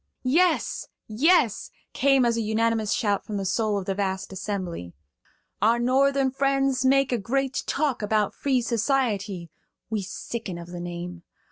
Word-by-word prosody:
"Yes, 325 +6 +2 0.2
yes!" 260 - +3 0.2
came 270 -2 +4
as 235 -1 +2
a 230 - 0
unanimous 220 0 0
shout 205 -3 +1
from 210 - -4
the 195 - -3
soul 205 +2 +1
of 195 - -4
the 195 - -1
vast 190 -1 -3
assembly. 185 - -4 0.7
"Our 225 +3 +4
Northern 265 +2 +2
friends 275 -1 +1
make 270 0 +3
a 245 - +1
great 265 +5 -1
talk 285 -5 0
about 210 -1 +1
free 260 -3 0
society. 215 - -1 0.4
We 215 -2 0
sicken 195 0 -5
of 170 0 -9
the 175 0 -7
name. 175 0 -6
225 Hz, 150 wpm, -25 LUFS, 195-265 Hz, 0.7 s, came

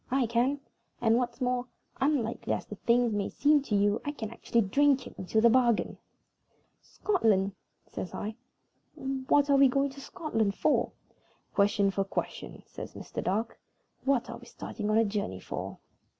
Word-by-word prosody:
I 265 0 +2
can; 240 +5 +1 0.4
and, 225 -1 +3
what's 245 +1 -2
more, 250 0 0 0.3
unlikely 265 -5 0
as - - -3
the - - -8
thing 235 +1 +2
may 200 -1 -1
seem 290 0 +3
to 235 -6 -2
you, 205 +1 +2
I 290 - -2
can 225 -7 -6
actually 230 0 0
drink 275 +6 +3
it - - -10
into 190 +4 0
the 235 - +7
bargain." 240 -2 +2 0.8
"Scotland!" 215 - +1 0.3
says 180 - -6
I. 215 +2 -4 0.6
"What 270 +2 +1
are 280 - +6
we 275 0 +7
going 275 +2 +1
to 275 +1 -11
Scotland 225 -10 -1
for?" - - +2 0.6
"Question 200 0 +3
for 195 0 0
question," 195 - -5
says - - -9
Mr. - - -6
Dark. 220 +5 -1 0.4
"What 270 -3 +2
are - - -6
we - - -14
starting 210 -2 -5
on 215 - +3
a 225 - +4
journey 200 - -3
for?" - - -6
235 Hz, 165 wpm, -29 LUFS, 210-270 Hz, 0.8 s, the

